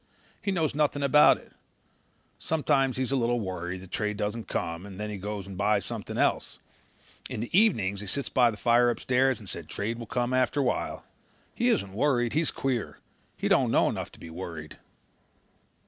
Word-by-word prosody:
He 200 - -1
knows 165 -5 0
nothing 145 -1 +1
about 150 +2 +6
it. - - -18 0.9
Sometimes 140 -5 +1
he's 130 0 -1
a - - +2
little 120 -1 +1
worried 90 -2 -4
that 95 -1 -13
trade 105 -1 -2
doesn't 105 +3 -3
come 85 +1 -3
and 100 -1 -10
then 105 0 -3
he 105 - -4
goes 105 +1 -5
and 100 -1 -8
buys - - +1
something - - -5
else. - - 0 0.7
In - - -4
the 120 +8 -3
evenings 110 - +3
he 105 - -7
sits 140 +8 -1
by 125 -2 +4
the 110 - -5
fire 120 +2 +4
upstairs 130 +2 +2
and 105 - -13
says 85 -3 -7
trade 115 +7 -3
will 115 - -7
come 125 +1 -1
after 130 +2 +2
a - - +3
while. 125 - -2 0.5
He 240 0 +1
isn't 100 - 0
worried. 120 0 +1
He's 155 +1 +2
queer. 130 -4 -2 0.4
He - - -1
doesn't - - +3
know - - +3
enough - - -4
to - - -15
be 80 - -10
worried." 80 -3 -7
120 Hz, 195 wpm, -28 LUFS, 100-135 Hz, 0.9 s, about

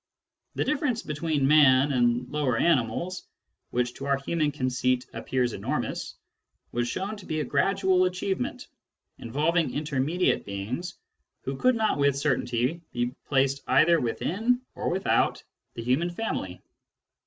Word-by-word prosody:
The - - +1
difference 285 -6 0
between 150 -2 0
man 140 -2 +6
and 120 -1 +2
the - - -16
lower 145 -6 0
animals, 170 +5 0 0.4
which 125 0 -1
to 135 - -7
our 140 -1 +2
human 150 +2 0
conceit 130 -2 0
appears 125 -3 -1
enormous, - - -3 0.6
was 120 0 -1
shown 195 - -3
to 200 - -12
be 155 -1 -1
a - - 0
gradual 185 +6 +2
achievement, 185 -5 -2 0.5
involving 155 +8 0
intermediate 150 +4 0
beings 110 - -5 0.5
who 135 - -3
could 255 - +3
not 220 -8 +1
with 140 -1 +3
certainty 130 +1 0
be 120 +1 -1
placed 135 0 +2
either 170 +1 +5
within 220 - 0
or - - -2
without 190 +2 +1 0.3
the 115 - -5
human 130 +9 +1
family. 175 - -4
145 Hz, 135 wpm, -27 LUFS, 125-175 Hz, 0.6 s, man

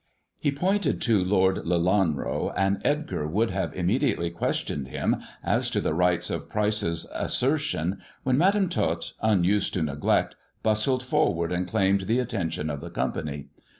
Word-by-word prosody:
He 145 - +1
pointed 180 +3 0
to 110 -6 +3
Lord 95 0 +3
Lelanro, 90 -2 +1
and 95 +1 +1
Edgar 150 - -1
would 105 +7 +1
have 95 0 -2
im 90 - -2
mediately 85 -4 +1
questioned 70 -4 -2
him - - 0 0.3
as - - +1
to - - 0
the - - 0
rights 90 +1 +1
of - - -4
Pryce's 105 -6 0
asser 140 +5 +1
tion, 95 - -2 0.2
when 130 -1 +2
Madam 195 +6 +3
Tot, - - -1
unused 100 -2 +2
to 90 - +1
neglect, 75 -1 0 0.3
bustled 110 +4 +1
forward 85 -9 +1
and 90 0 -1
claimed 95 +1 +1
the 115 - +2
attention 85 -10 -2
of 70 -1 -5
the 85 - -7
company. 75 -4 -3
95 Hz, 155 wpm, -26 LUFS, 85-120 Hz, 0.3 s, to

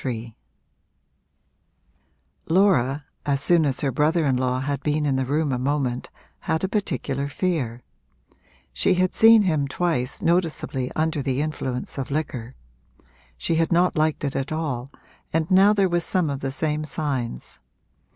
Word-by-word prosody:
III 115 -3 -4 2.1
Laura, 155 -7 +3 0.2
as 140 -1 +1
soon 165 +1 +3
as 135 - -1
her 140 - 0
brother 155 +4 +2
in 135 -2 +2
law 125 0 0
had 140 0 -2
been 150 +1 0
in 140 -2 +1
the 130 -1 -1
room 150 +1 0
a 125 - -1
moment, 130 -2 -1 0.3
had 160 0 -2
a - - +2
particular 140 -9 -2
fear; 140 -7 -2 0.9
she - - +2
had 185 0 +1
seen 225 -1 +7
him 155 -7 +1
twice 140 -4 -1
noticeably 165 -7 0
under 155 -1 0
the 135 -1 -1
influence 140 -4 -3
of 130 - -4
liquor; 140 -5 -4 0.8
she 165 - 0
had 165 +1 +1
not 175 +1 +3
liked 155 -1 0
it 140 - -2
at 135 +2 -2
all 140 -6 -3 0.4
and 160 +1 -1
now 195 +2 +6
there 200 -2 +3
were 175 -1 +1
some 170 -2 0
of 140 - -3
the 135 - -3
same 150 +2 -1
signs. 135 - -3
150 Hz, 155 wpm, -24 LUFS, 130-165 Hz, 2.1 s, seen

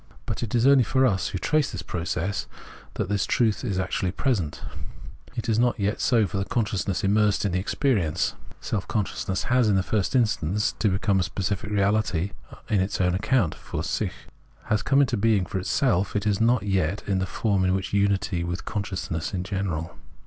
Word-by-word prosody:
But - - -3
it 115 0 -2
is 120 +1 +3
only 135 -2 +6
for 130 +3 +2
us 95 -7 +1
[who - - -3
trace 150 +9 +1
this 90 -6 -5
process] 90 +3 -2 0.5
that - - -1
this 100 -1 0
truth 110 -4 +1
is 100 -7 -1
actually 95 0 -1
present; 95 - -1 0.7
it 115 - -3
is 110 -1 +2
not 120 -1 +2
yet 100 +1 0
so 115 -5 +3
for 95 - -3
the 95 - -1
consciousness 100 -4 -1
immersed 105 +1 +2
in 100 - +1
the 90 - 0
experience. 95 - 0 0.3
Self 100 -3 -3
consciousness 95 -2 -2
has 125 -3 +3
in 100 - +3
the 95 - +2
first 100 0 0
iustance 105 - +1 0.2
become 95 +1 +1
a - - +3
specific 100 +3 -2
reahty 100 -3 +1 0.4
on 105 - +3
its 95 +2 -1
own 90 -2 +2
account 105 -2 +1
{fiir - - -5
sich), - - -1 0.5
has 105 -2 0
come 135 +6 +3
into 125 -4 +1
being 105 -2 +2
for 95 +2 -3
itself; 100 - +1
it 100 0 0
is 105 0 +1
not 120 +1 +3
yet 95 -2 0
in 95 -2 0
the 95 - -1
form 100 -1 0
of 95 +1 0
unity 100 -3 +1
with 85 +1 -4
consciousness 95 -4 -3
in 90 - -2
general. 90 -4 -3
100 Hz, 190 wpm, -25 LUFS, 95-110 Hz, 0.7 s, only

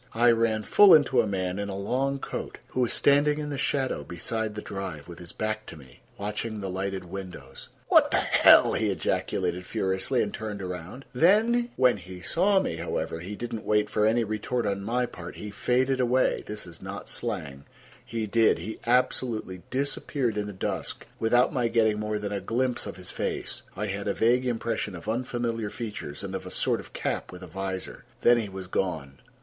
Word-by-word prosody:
I 120 +1 +6
ran 115 -2 +1
full 205 - +8
into 135 -5 +4
a 110 - -2
man 95 -1 -2
in 100 0 -3
a 95 - -4
long 135 +7 0
coat, - - -5
who - - -3
was 125 -2 +2
standing 145 +1 +4
in 150 -1 -4
the 140 - -3
shadow 135 -1 0
beside 110 +5 -3
the 105 - -4
drive, 95 -7 -6
with 85 -1 -10
his 85 -1 -9
back 110 0 -3
to - - -8
me, 65 -4 -16 0.2
watching 105 +2 -3
the 95 -2 -4
lighted 95 0 -3
windows. 90 -7 -8 0.2
"What - - +6
the - - +2
hell!" - - +6
he 110 -1 +1
ejaculated 90 0 -1
furiously, 95 +8 0
and 105 - -4
turned 105 -1 -5
around. 90 +7 -6
When 205 - +4
he 90 -1 -10
saw 190 - +3
me, 85 - -2
however, 80 - -3
he 95 +5 -6
did 120 +2 -5
not 110 -1 -4
wait 105 0 +1
for 105 0 +3
any 115 +2 +3
retort 110 +3 -2
on 100 -1 -1
my 125 +4 +1
part. 90 -7 -9
He 105 -1 -7
faded 130 +5 +1
away—this 125 -4 +1
is 85 -2 -12
not - - -7
slang; 70 0 -4 0.4
he 115 -2 -3
did—he 110 -2 +2
absolutely 120 -6 +1
disappeared 135 -2 -1
in 105 -1 -2
the - - -5
dusk 95 - -3
without 120 +3 +3
my 125 -3 +1
getting 110 -2 +2
more 105 0 -1
than 105 -1 -4
a 100 -1 -2
glimpse 120 +4 -1
of 100 - -7
his 90 -1 -6
face. - - -3 0.2
I 105 - -1
had 100 0 -3
a 100 - 0
vague 125 +3 +3
impression 115 -4 -2
of 85 - -10
unfamiliar 115 -1 -1
features 105 -11 -6
and - - -5
of - - -5
a - - -5
sort - - 0
of - - -11
cap - - -3
with 90 0 -10
a - - -8
visor. 95 +2 -5 0.2
Then 120 0 +6
he 105 -3 -3
was 95 -1 -7
gone. 80 -8 -2
105 Hz, 195 wpm, -27 LUFS, 95-120 Hz, 0.4 s, full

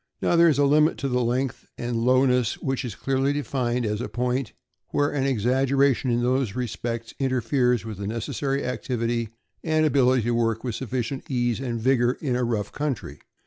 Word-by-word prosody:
Now - - +1
there 170 0 +6
is 145 - +2
a 145 - +4
limit 150 +3 +4
to 140 - -2
length 125 0 -1
and 120 0 -3
lowness, 125 -1 +3
which 135 0 -2
is 120 -5 -5
clearly 135 +1 0
defined 125 -4 -1
as 105 +1 -1
a - - -4
point 125 -1 -2 0.4
where 145 0 +1
an 135 -2 -1
exaggeration 135 +2 +2
in 120 0 +1
those 125 -4 0
respects 115 -2 -4
interferes 125 -2 +1
with 110 -3 -7
the 100 - -4
necessary 135 +5 -2
activity 120 -2 -2 0.3
and 155 -1 +2
ability 130 -4 +3
to 120 - 0
work 115 -1 0
with 125 -3 -2
suffi 130 +2 -2
cient 130 +3 -6
ease 120 -3 0
and 120 -3 -3
vigor 125 0 +3
in 130 -5 -1
a 125 - 0
rough 115 -4 -1
country. 130 - -4
125 Hz, 185 wpm, -25 LUFS, 120-135 Hz, 0.4 s, there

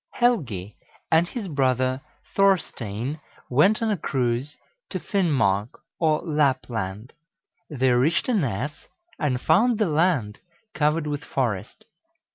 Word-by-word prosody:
Helgi 130 - 0 0.3
and 165 +2 +4
his 220 0 -5
brother 130 -3 +1 0.3
Thorstein 150 - 0 0.3
went 195 - +4
on 220 - +1
a 205 - 0
cruise 130 -1 -1 0.3
to - - -3
Finnmark, 130 - +1 0.3
or 155 -2 +2
Lapland. 125 - -1 0.6
They 130 -4 +1
reached 130 +7 +2
a 250 - +1
ness, 145 - -2 0.3
and 130 -4 0
found 220 - +3
the 215 - +2
land 150 - +1 0.3
covered 150 +1 +1
with 145 -1 -3
forest. 115 -8 -3
145 Hz, 115 wpm, -24 LUFS, 120-170 Hz, 0.6 s, and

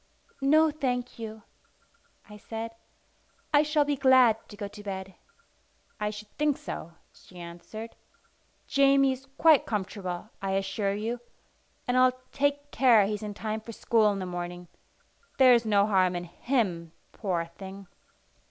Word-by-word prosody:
"No, 310 +3 +5
thank 250 -5 -3
you," 220 -1 -7 0.8
I 210 - -12
said. 225 +2 -6 0.8
"I 290 - +7
shall 300 -1 +2
be 290 0 0
glad 260 -4 +6
to 205 - -11
go 205 -1 -4
to 205 +1 -11
bed." 190 -1 -6 0.9
"I 210 0 0
should 210 0 -8
think 295 -2 +2
so," 170 - -7 0.2
she 180 - -17
answered. 175 +6 -9 0.7
"Jamie 275 -1 +4
is 265 +1 -7
quite 315 -3 +5
comfortable, 195 -1 -4
I 195 -1 -1
assure 195 +1 -1
you; 225 +4 -3 0.7
and 245 - +1
I'll 255 0 +4
take 285 +1 0
care 235 -6 +5
he's 210 +1 -3
in 210 -1 -6
time 220 +1 -3
for 230 +1 -9
school 220 -1 +3
in 200 - -3
the 190 - -4
morning. 175 -1 -6 0.7
There's 245 -3 +6
no 200 -1 +4
harm 185 -3 +2
in 175 - -3
him, 175 -3 -2 0.2
poor 180 -5 -2
thing!" 190 +3 -10
215 Hz, 145 wpm, -28 LUFS, 195-255 Hz, 0.9 s, I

